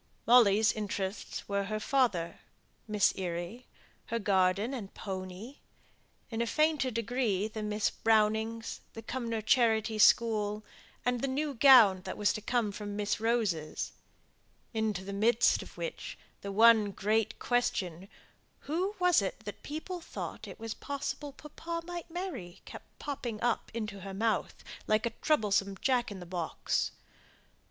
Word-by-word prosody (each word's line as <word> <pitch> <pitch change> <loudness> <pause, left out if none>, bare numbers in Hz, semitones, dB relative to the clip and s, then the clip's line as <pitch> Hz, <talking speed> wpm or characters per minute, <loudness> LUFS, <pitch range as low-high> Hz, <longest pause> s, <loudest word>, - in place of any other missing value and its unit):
Molly's 220 -3 +6
interests 200 -1 -4
were 200 0 0
her 215 +1 -2
father, 215 -10 +1 0.5
Miss 210 -2 +3
Eyre, 175 +5 -4 0.5
her 230 - -1
garden 200 +2 +2
and 215 -7 -6
pony; 190 +6 -6 0.7
in 225 0 -1
a 235 - 0
fainter 305 -1 +2
degree 230 -3 -1
Miss 210 -1 -1
Brownings, 220 +1 +1
the 225 - -8
Cumnor 230 -2 -3
Charity 220 -2 +2
School, 215 -2 +4 0.4
and 245 -1 +1
the 275 - 0
new 285 +2 -1
gown 230 -7 +7
that - - -5
was 205 - +2
to 215 - -5
come 230 -2 0
from 205 0 -6
Miss 210 0 -1
Rose's; 215 -9 -1 0.8
into 215 -4 -1
the 200 +1 -6
midst 225 +4 +3
of - - -12
which - - -5 0.2
the 200 - -5
one 220 0 +6
great 215 +3 0
question, 195 -7 -1 0.5
"Who 365 +7 -2
was 360 - +4
it 195 +2 -4
that 205 -1 -8
people 330 +4 -5
thought - - -7
it - - -10
was 225 -1 -4
possible 285 +1 -4
papa 330 +4 -7
might 350 -1 -6
marry?" 330 - -6
kept - - -12
popping 245 -7 -4
up 240 -1 0
into 215 -3 -5
her 195 0 -7
mouth, 220 0 -1 0.2
like 215 +2 +2
a 235 - 0
troublesome 200 -9 +2
Jack 250 -2 +1
in 200 - -7
the 180 - -8
box. 175 -2 -1
220 Hz, 145 wpm, -31 LUFS, 200-245 Hz, 0.8 s, gown